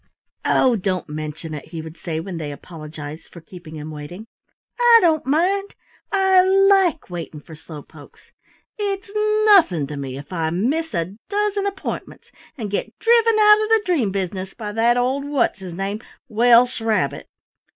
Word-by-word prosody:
"Oh, 255 -2 +3
don't 185 -3 -2
mention 155 +1 -6
it," 150 - -7
he 165 0 -8
would 160 0 -8
say 160 -3 -4
when 175 +1 -6
they 150 -3 -5
apologized 155 0 -9
for 170 - -11
keeping 165 -1 -12
him 155 +1 -7
waiting. 155 +8 -9 0.5
"I 480 -1 +7
don't 320 - +2
mind. 380 +8 0 0.4
I 385 -2 +4
like 385 - +3
waiting 165 -3 -6
for 160 - -14
slow 155 -1 -11
pokes! - - -17 0.5
It's 400 0 -3 0.3
nothing 325 - +5
to 145 +1 -7
me 135 -2 -5
if 145 +6 -10
I 165 -2 -1
miss 250 - -1
a 170 +2 -2 0.2
dozen 410 0 0
appointments 390 -1 -6 0.3
and 215 -5 -5
get 205 - -4
driven 460 -1 +3
out 420 0 +6
of 430 - -2
the 445 -1 +4
dream 295 - +1
business 190 0 -4
by 210 -3 -6
that 230 +3 +2
old 260 +3 0
what's 280 -7 0
his 180 -3 -8
name 200 +3 -3 0.3
Welsh 240 +1 +4
Rabbit!" 225 -1 -1
215 Hz, 165 wpm, -21 LUFS, -, 0.5 s, I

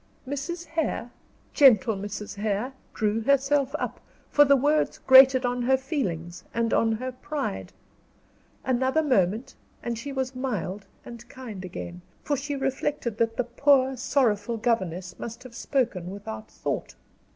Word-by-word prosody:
Mrs. 325 +6 -4
Hare, 315 -7 -2 0.4
gentle 235 - +6
Mrs. 205 +1 -6
Hare, 215 +5 -1 0.2
drew 215 +1 0
herself 280 +2 +2
up, - - -4 0.3
for 290 - +7
the 280 -1 +5
words 295 +3 +1
grated 260 0 +7
on 245 0 -1
her 265 +2 +3
feelings 180 - -3
and 230 -1 +1
on 225 0 +3
her 255 +4 -3
pride. 255 - -4 0.9
Another 260 +4 +2
moment, 235 -1 +1 0.3
and 235 -1 -3
she 280 +4 -6
was 265 -1 -2
mild 210 -6 -4 0.2
and 235 -1 -11
kind 225 -7 -8
again, 175 -1 -7 0.2
for 290 - 0
she 285 +1 -3
reflected 270 -3 -2
that 225 0 +1
the 250 - +2
poor, 265 +2 +3
sorrowful 235 -4 +1
governess 185 -6 -1
must 235 +2 -7
have 255 -2 -12
spoken 230 -8 -1
without 110 - -7
thought. - - -4
245 Hz, 140 wpm, -26 LUFS, 210-270 Hz, 0.9 s, for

